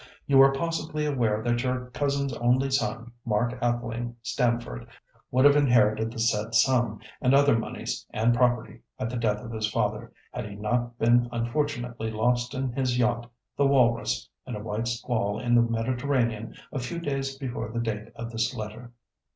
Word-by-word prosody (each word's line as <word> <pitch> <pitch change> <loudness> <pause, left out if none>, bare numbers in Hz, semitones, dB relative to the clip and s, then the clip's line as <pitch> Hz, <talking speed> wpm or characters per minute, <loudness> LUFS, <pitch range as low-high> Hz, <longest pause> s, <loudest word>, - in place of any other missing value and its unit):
"You 135 -1 +6
are 135 0 +7
possibly 155 +1 -2
aware 115 -7 0
that 120 0 +1
your 125 0 -2
cousin's 140 0 -1
only 125 +3 +2
son, 120 -3 -1
Mark 120 +2 0
Atheling 120 0 -2
Stamford, 120 - -1 0.4
would 130 +2 +3
have 145 0 +7
inherited 110 -6 +3
the 120 - -10
said 115 0 0
sum, 120 -4 +3 0.2
and 130 +1 +4
other 140 -2 +5
moneys 115 - -3
and 115 +2 +2
property, 120 -2 +1 0.2
at 125 -2 -3
the - - -4
death 110 -3 0
of 115 - -7
his 110 -1 -1
father, 105 +1 -1 0.2
had 105 - -5
he 100 - -8
not 120 +3 -1
been 120 +1 +3
unfortunately 120 -1 -2
lost 120 +4 0
in 130 -1 -1
his 125 -1 0
yacht, 120 -1 +1 0.3
the 140 - +3
Walrus, 125 -4 +2 0.2
in 125 - -4
a - - -5
white 110 +2 -2
squall 115 -3 -1
in 120 -1 0
the 120 - +7
Mediterranean, 115 -1 -1 0.2
a 135 - -3
few 125 +7 -4
days 135 -4 -3
before 130 -5 -4
the 115 +1 -3
date 110 -2 -3
of 115 0 -6
this 115 +2 -1
letter. 110 +2 -7
120 Hz, 175 wpm, -27 LUFS, 115-130 Hz, 0.4 s, are